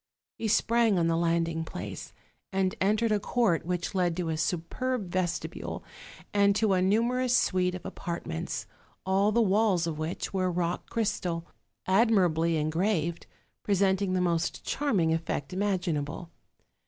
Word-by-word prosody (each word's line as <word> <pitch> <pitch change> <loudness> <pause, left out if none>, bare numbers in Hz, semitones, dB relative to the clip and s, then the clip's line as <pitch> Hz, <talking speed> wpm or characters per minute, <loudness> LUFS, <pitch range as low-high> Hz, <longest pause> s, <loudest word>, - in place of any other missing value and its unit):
He 225 - -1
sprang 225 0 +3
on 170 - +2
the 165 0 +2
landing 165 -1 +1
place, - - -7 0.4
and 190 -1 +1
entered 215 +3 +2
a 210 - +3
court 205 -6 +1
which 180 +1 -2
led 180 -3 +1
to 175 -3 -1
a 160 - 0
superb 180 +7 -2
vestibule 180 -1 -3 0.5
and 200 -1 +4
to 210 -2 +2
a 185 - +2
numerous 240 +6 +2
suite 180 -1 +1
of 180 - -9
apartments, 170 - -4 0.4
all 195 +2 +3
the 235 +2 +3
Walls 200 -3 +2
of 160 -2 -3
which 160 +5 -3
were 185 -1 +1
of 175 - -4
rock 175 0 -2
crystal, 190 -7 -1 0.4
admirably 185 -6 +3
engraved, 165 +2 0 0.3
presenting 195 -1 +1
the 185 - +1
most 170 -2 0
charming 200 - +1
effect 165 -2 -3
imaginable. 175 -5 -2
185 Hz, 140 wpm, -28 LUFS, 170-205 Hz, 0.5 s, and